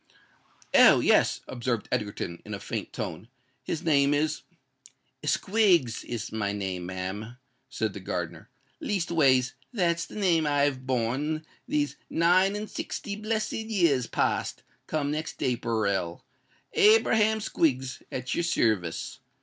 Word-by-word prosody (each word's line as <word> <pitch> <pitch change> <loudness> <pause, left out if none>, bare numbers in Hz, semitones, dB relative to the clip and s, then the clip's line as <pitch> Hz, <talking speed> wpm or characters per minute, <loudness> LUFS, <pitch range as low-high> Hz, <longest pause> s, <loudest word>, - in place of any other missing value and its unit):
"Oh! - - +8
yes," - - +3
observed 120 -3 -2
Egerton, 100 -7 -3
in 105 - -5
a - - -7
faint - - -5
tone, 90 +7 -5 0.3
"his 160 - -4
name 145 -2 +3
is——" 155 +1 0 0.8
"Squiggs 175 - +2
is 120 -3 -5
my 105 -2 -1
name, 95 -3 -4
ma'am," 95 +6 -5 0.3
said 110 -3 -2
the - - -7
gardener: 85 -3 -5 0.3
"leastways, 145 -10 +2 0.2
that's 170 -7 0
the - - -12
name 170 -7 +2
I've 140 -3 +1
bore 130 +6 -1 0.2
these 145 -1 0
nine 185 +4 +3
and 210 +1 -4
sixty 200 -1 -5
blessed 215 +1 -2
years 175 - +1
past, - - -1 0.2
come 145 -2 -1
next 155 +1 -4
Aperil—Abraham 125 - +1
Squiggs 135 -10 0
at 130 0 -3
your 170 - 0
service. 110 - 0
140 Hz, 120 wpm, -27 LUFS, 110-170 Hz, 0.8 s, Oh